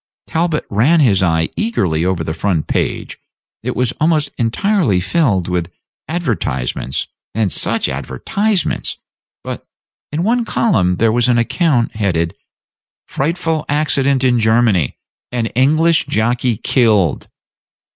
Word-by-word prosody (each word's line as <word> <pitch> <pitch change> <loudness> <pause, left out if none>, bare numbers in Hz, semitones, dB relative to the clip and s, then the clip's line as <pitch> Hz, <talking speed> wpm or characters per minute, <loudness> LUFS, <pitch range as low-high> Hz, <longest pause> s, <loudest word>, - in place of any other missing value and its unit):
Talbot 160 -1 -1
ran 130 +12 +3
his 110 -11 +3
eye 80 -3 +1
eagerly 90 - 0
over 90 -2 0
the 80 - -3
front 85 -1 -1
page; - - -2 0.4
it - - -3
was 125 -2 +1
almost 155 -3 +2
entirely 125 - +1
filled 100 - +1
with 90 -1 -2 0.4
advertisements 90 - -2 0.3
(and 110 -4 +1
such - - +1
advertisements!), 205 -4 -1 0.5
but - - -7 0.4
in 155 +3 -1
one 235 +4 +2
column 130 - +1
there 110 +4 +2
was 120 +2 +2
an 120 - +3
account 120 -1 +1
headed 85 -6 0 0.7
"FRIGHTFUL 160 +1 -1
ACCIDENT 140 -2 +1
IN 125 -2 +3
GERMANY: 110 - +2 0.3
AN 120 -2 -1
ENGLISH 155 +5 +3
JOCKEY 120 +1 0
KILLED." 105 - +2
120 Hz, 120 wpm, -17 LUFS, 95-155 Hz, 0.7 s, ran